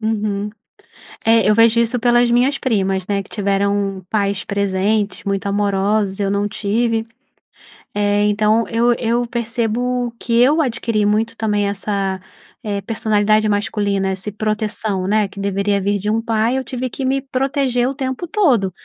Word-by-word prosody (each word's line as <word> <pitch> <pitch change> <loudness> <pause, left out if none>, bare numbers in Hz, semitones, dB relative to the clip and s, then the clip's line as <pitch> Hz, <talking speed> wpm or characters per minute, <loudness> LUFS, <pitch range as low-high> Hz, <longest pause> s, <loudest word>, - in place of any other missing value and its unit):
Uhum, 210 -2 -2 0.8
é 225 -1 +4
eu 210 - +4
vejo 230 0 +5
isso 235 +2 +1
pelas 240 0 +3
minhas 255 +4 +3
primas, 195 -7 0
né, 200 -1 0
que 195 - -10
tiveram 200 -1 -1
pais 200 -2 -1
presentes, 200 +1 -1
muito 200 0 -2
amorosos, 200 0 0
eu 195 -1 0
não 200 +1 0
tive. 225 +2 -1 0.9
Eh, 205 0 +1
então, 215 +2 +2
eu 235 +1 +3
eu 235 +1 -1
percebo 235 +1 -1
que 235 - -4
eu 300 +6 +4
adquiri 230 -5 0
muito 220 +2 +1
também 210 -2 0
essa 195 -1 -2 0.7
personalidade, 215 -1 +2
eh, - - +1
masculina, 205 -2 0
esse 195 +2 -5
proteção, 215 -2 -2
né. 210 +1 +2
Que 200 - -18
deveria 200 0 0
vir 200 +1 0
de 210 +2 -3
um 225 +1 +1
pai, 225 +2 0
eu 265 - -2
tive 255 0 -4
que 270 - -6
me 270 +1 +1
proteger 265 -2 0
o - - -3
tempo 260 +3 -4
todo. 285 - +2
215 Hz, 155 wpm, -19 LUFS, 200-235 Hz, 0.9 s, vejo